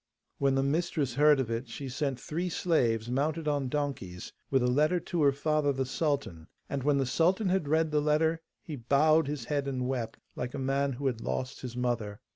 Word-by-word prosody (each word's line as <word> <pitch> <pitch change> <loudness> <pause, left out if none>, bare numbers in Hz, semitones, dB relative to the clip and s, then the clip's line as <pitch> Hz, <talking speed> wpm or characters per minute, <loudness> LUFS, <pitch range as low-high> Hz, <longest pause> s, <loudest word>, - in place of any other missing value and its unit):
When 135 -1 +2
the 135 - +2
mistress 150 -2 0
heard 150 +2 +5
of 120 -3 -1
it, 115 +3 -3
she 135 +4 -6
sent 135 0 -2
three 175 +4 -3
slaves, 120 -11 +1
mounted 150 +4 -1
on 145 -3 0
donkeys, 130 -11 -4 0.2
with 135 -2 +2
a - - +2
letter 150 +8 +3
to 170 0 -2
her 140 -1 +5
father 150 +1 +1
the 135 -1 -1
sultan, 135 - -2 0.2
and 140 - -3
when 145 +1 +2
the 135 - +1
sultan 180 - +2
had 185 -5 +1
read 160 +1 +2
the 150 0 +2
letter 160 +2 +2 0.2
he 155 - -6
bowed 145 +5 +3
his 145 -1 -4
head 145 -2 -1
and 130 -2 -2
wept, 125 -4 -3 0.2
like 125 0 -4
a - - -3
man 135 +1 0
who 140 +3 -6
had 120 -4 0
lost 130 +2 -3
his 125 -1 -6
mother. 115 -5 -2
140 Hz, 210 wpm, -29 LUFS, 125-155 Hz, 0.2 s, heard